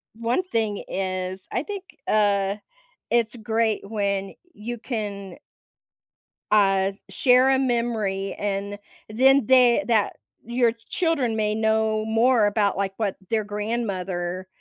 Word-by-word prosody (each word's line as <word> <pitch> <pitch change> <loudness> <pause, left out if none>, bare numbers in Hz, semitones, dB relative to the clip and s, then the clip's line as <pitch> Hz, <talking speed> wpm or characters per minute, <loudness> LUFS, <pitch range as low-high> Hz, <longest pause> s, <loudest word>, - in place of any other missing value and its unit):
one 235 +9 0
thing 215 -3 -1
is 185 0 -3
I 250 - 0
think, 400 +2 -6 0.2
uh, 200 -2 +2 0.6
it's 235 -2 +1
great 220 -1 0
when 200 -2 -1 0.2
you 235 +3 -6
can 205 -6 -5 1.1
uh, 195 -2 +3
s 195 - -25
share 250 +6 +4
a 265 - +4
memory 230 -7 -1
and 200 0 -3 0.3
then 265 +3 +4
the 255 +1 +5
that 220 -4 +2 0.3
your 240 0 +2 0.2
children 285 -10 0
may 215 -1 0
know 220 0 +1
more 225 +1 +3
about, 205 -1 +1
like, 195 -1 -1
what 210 -4 -1 0.2
their 220 -1 +1
grandmother 195 -4 -3
215 Hz, 125 wpm, -24 LUFS, 200-235 Hz, 1.1 s, the